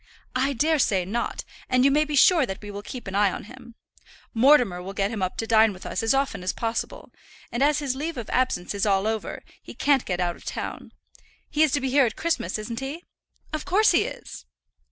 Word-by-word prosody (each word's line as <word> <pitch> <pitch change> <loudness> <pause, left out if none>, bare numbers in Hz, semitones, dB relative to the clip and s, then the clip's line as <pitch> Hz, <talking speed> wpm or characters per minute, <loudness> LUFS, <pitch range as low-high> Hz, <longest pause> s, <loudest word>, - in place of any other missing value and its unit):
"I 270 +2 +1
daresay 265 - +2
not; 235 +6 -3 0.2
and 255 0 +3
you 275 - +5
may 300 +2 +3
be 300 -1 -3
sure 310 +1 +5
that 190 -1 -5
we 205 - -7
will 200 0 -6
keep 245 +4 -8
an 190 - -5
eye 200 -1 +3
on - - -6
him. 240 +1 -13 0.6
Mortimer 235 -7 +4
will 190 +2 -7
get 195 +1 0
him 220 -4 -4
up 185 -1 -2
to 225 - -2
dine 220 -1 +4
with 185 - -12
us - - -2
as 225 +4 +2
often 270 -7 -1
as 180 - -2
possible, 230 0 -4 0.4
and 240 - -3
as 295 +1 +4
his 280 -3 -2
leave 310 +3 -4
of 235 - -5
absence 250 -9 0
is 200 +1 0
all 195 0 +2
over, 220 0 -3 0.2
he - - -11
can't 280 -3 +2
get 180 -2 -3
out 175 -1 0
of - - -17
town. - - -6 0.6
He's 310 -1 +3
to 285 - +1
be 265 -1 -1
here 275 -2 +5
at 220 - -5
Christmas, 325 - -1
isn't 230 +2 -5
he?" 280 +6 -6 0.5
"Of 310 - -2
course 425 +4 +4
he - - +3
is." - - -8
240 Hz, 225 wpm, -25 LUFS, 205-280 Hz, 0.6 s, you